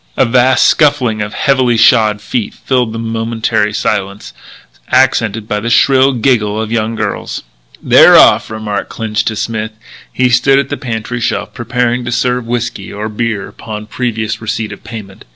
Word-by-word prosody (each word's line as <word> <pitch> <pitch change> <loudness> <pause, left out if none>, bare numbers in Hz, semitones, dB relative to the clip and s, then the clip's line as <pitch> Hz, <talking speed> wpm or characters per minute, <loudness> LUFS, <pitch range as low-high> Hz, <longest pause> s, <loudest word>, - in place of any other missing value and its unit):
A - - +4
vast 130 +2 +3
scuffling 135 -8 +2
of 105 0 -5
heavily 130 -4 +2
shod 110 -3 +4
feet 110 +1 -3
filled 125 -4 -1
the 115 - -6
momentary 115 -1 -1
silence, 100 -1 -3 0.6
accented 115 -4 +1
by 105 - -1
the 115 +3 -3
shrill 135 +2 +4
giggle 110 -4 +1
of 110 0 -4
young 115 0 -1
girls. - - -4 0.4
"They're - - +7
off," - - +5
remarked 110 -2 -4
Clinch 110 -1 -2
to 110 - -1
Smith, 110 0 -3 0.4
who 125 -1 +2
stood 135 +3 +4
at 140 0 0
the 145 - -2
pantry 120 0 -4
shelf - - -2
prepared 125 +1 -1
to 120 - -3
serve 125 0 -1
whiskey 115 -4 -4
or 105 +2 -5
beer 110 -2 -3
upon 105 -1 -8
previous 110 -2 -3
receipt 110 -1 -3
of - - -11
payment. 110 -4 -10
115 Hz, 165 wpm, -13 LUFS, 110-125 Hz, 0.6 s, They're